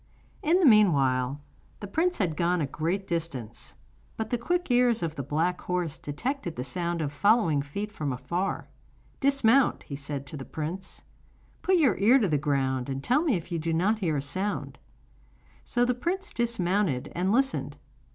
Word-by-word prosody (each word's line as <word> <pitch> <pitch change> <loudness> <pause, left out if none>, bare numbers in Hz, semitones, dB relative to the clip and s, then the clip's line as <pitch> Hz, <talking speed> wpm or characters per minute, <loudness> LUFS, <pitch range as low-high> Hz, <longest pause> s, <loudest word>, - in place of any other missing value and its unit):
In 335 +4 +3
the 365 - +4
meanwhile 140 - +4 0.4
the 205 - -6
prince 335 - 0
had 175 -6 0
gone 175 +2 +1
a 150 - +1
great 170 +8 -2
distance; 140 -10 -4 0.4
but 220 -1 -4
the 245 - +2
quick 350 +4 -1
ears 245 -4 +3
of 165 -2 -2
the 145 - -4
black 160 +6 -1
horse 175 -4 -2
detected 175 - -4
the 125 - -3
sound 170 +6 -2
of 145 -2 -3
following 200 -5 +3
feet 200 +10 -5
from 150 -9 -3
afar. 175 +9 -3 0.5
'Dismount,' 275 -2 +3
he 140 - -7
said 140 -1 -5
to 150 - -7
the 135 - -6
prince; 165 +7 -6 0.6
'put 375 - +3
your 270 - +3
ear 225 +7 +6
to 225 -7 +2
the 150 -4 +1
ground, 135 -3 0
and 135 0 -4
tell 255 +5 +3
me 310 -9 +2
if 175 0 -5
you 170 - -1
do 165 +1 -1
not 200 +7 +2
hear 165 -7 0
a 135 - -2
sound.' 190 +8 -2 0.8
So 245 0 +1
the 250 - +2
prince 365 +10 -3
dismounted 190 - 0
and 180 +3 0
listened. 265 +4 0
180 Hz, 180 wpm, -27 LUFS, 145-235 Hz, 0.8 s, ear